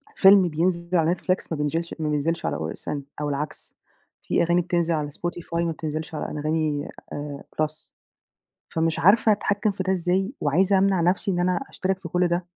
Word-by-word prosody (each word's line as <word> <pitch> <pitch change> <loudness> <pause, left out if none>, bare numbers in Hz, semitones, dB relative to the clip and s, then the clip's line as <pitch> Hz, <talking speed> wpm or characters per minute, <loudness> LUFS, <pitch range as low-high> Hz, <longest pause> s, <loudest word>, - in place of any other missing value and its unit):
فيلم 195 -1 +7
بينزل 170 +2 0
على 165 +1 +3
Netflix 185 +1 -1
ما 160 - -1
بينزلش 165 +3 -2
ما 155 -1 -1
بينزلش 155 +3 -1
على - - -1
OSN 80 - -4 0.2
أو 150 - -1
العكس، 145 +1 -5 0.5
في - - +1
أغاني 175 +1 +3
بتنزل 170 -1 0
على 150 -2 -2
Spotify 175 +1 -5
ما 170 -1 +1
بتنزلش 155 0 -4
على - - -3
أنغامي 150 -1 -1 0.3
آآ 145 -1 -6 0.2
بلس، 155 0 -3 0.7
فمش 165 0 0
عارفة 210 +6 +5
أتحكّم 205 0 +1
في 190 -1 -4
ده 190 - 0
إزاي، 190 - 0
وعايزة 185 +7 +3
أمنع 190 -2 +3
نفْسي 185 +4 +1
إن 175 - -1
أنا 180 0 +2
أشترك 190 0 -2
في 170 - -7
كلّ 180 +1 +2
ده، 175 +1 -1
170 Hz, 180 wpm, -24 LUFS, 155-185 Hz, 0.7 s, فيلم